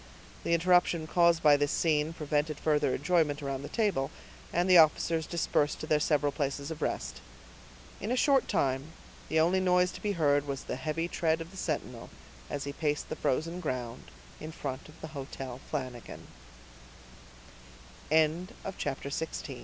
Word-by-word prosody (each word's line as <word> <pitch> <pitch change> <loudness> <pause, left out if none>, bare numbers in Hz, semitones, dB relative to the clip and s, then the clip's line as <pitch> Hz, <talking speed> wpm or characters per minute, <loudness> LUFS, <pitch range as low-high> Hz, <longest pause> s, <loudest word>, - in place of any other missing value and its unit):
The 170 - +2
interruption 175 -1 +3
caused 170 0 +3
by 150 -1 +7
this 145 0 +1
scene 155 -1 +1
prevented 150 -1 -1
further 150 -4 +2
enjoyment 150 -1 +1
around 135 -1 -3
the 145 - -7
table, 200 - 0 0.4
and 175 +2 +1
the 180 -2 +8
officers 160 0 +3
dispersed 150 -3 0
to - - -5
their 155 -1 +2
several 145 -1 +2
places 140 +1 -3
of 160 - -6
rest. - - -3 0.8
In 205 - -4
a - - +2
short 270 0 +3
time 135 +3 0 0.4
the 160 - +2
only 175 +4 +3
noise 180 -1 +3
to - - -10
be 205 -1 0
heard 145 -4 +2
was 135 -1 -4
the - - -4
heavy 155 +5 -2
tread 160 -2 0
of 165 +1 -7
the - - -14
sentinel, 135 -9 -4 0.4
as 145 -1 -3
he 140 - -5
paced 150 -1 -1
the - - -3
frozen 165 +6 -1
ground 125 -7 -4 0.3
in 155 - -7
front 135 -2 -6
of 155 - -16
the 160 - -6
Hotel 135 -3 -7
Flan 130 -4 -2
155 Hz, 155 wpm, -30 LUFS, 140-170 Hz, 0.8 s, the